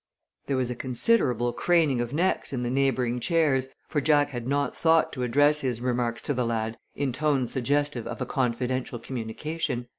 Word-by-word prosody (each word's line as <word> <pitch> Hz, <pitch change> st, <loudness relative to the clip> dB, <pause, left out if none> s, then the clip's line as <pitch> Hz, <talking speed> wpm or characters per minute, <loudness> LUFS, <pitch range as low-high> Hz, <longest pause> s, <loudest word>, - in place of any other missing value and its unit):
There 135 Hz, -, 0 dB
was 125 Hz, -1 st, 0 dB
a -, -, -3 dB
considerable 125 Hz, -, +1 dB
craning 160 Hz, -8 st, +2 dB
of 120 Hz, 0 st, -3 dB
necks 175 Hz, +6 st, 0 dB
in 125 Hz, -2 st, -2 dB
the 120 Hz, -, -1 dB
neighboring 130 Hz, -2 st, +1 dB
chairs, 140 Hz, -3 st, +2 dB, 0.2 s
for 150 Hz, -, 0 dB
Jack 145 Hz, -1 st, +3 dB
had 120 Hz, -2 st, -5 dB
not 140 Hz, +1 st, 0 dB
thought 165 Hz, 0 st, +3 dB
to 130 Hz, -, -5 dB
address 145 Hz, +5 st, +3 dB
his 125 Hz, -4 st, -2 dB
remarks 120 Hz, -1 st, -1 dB
to 145 Hz, -, -1 dB
the 125 Hz, -1 st, 0 dB
lad 115 Hz, -1 st, -2 dB, 0.2 s
in 135 Hz, -3 st, -1 dB
tones 140 Hz, -3 st, 0 dB
suggestive 140 Hz, -1 st, 0 dB
of 120 Hz, -, -6 dB
a 125 Hz, -, -2 dB
confidential 125 Hz, 0 st, -1 dB
communication. 125 Hz, +2 st, -4 dB
130 Hz, 180 wpm, -26 LUFS, 120-145 Hz, 0.2 s, Jack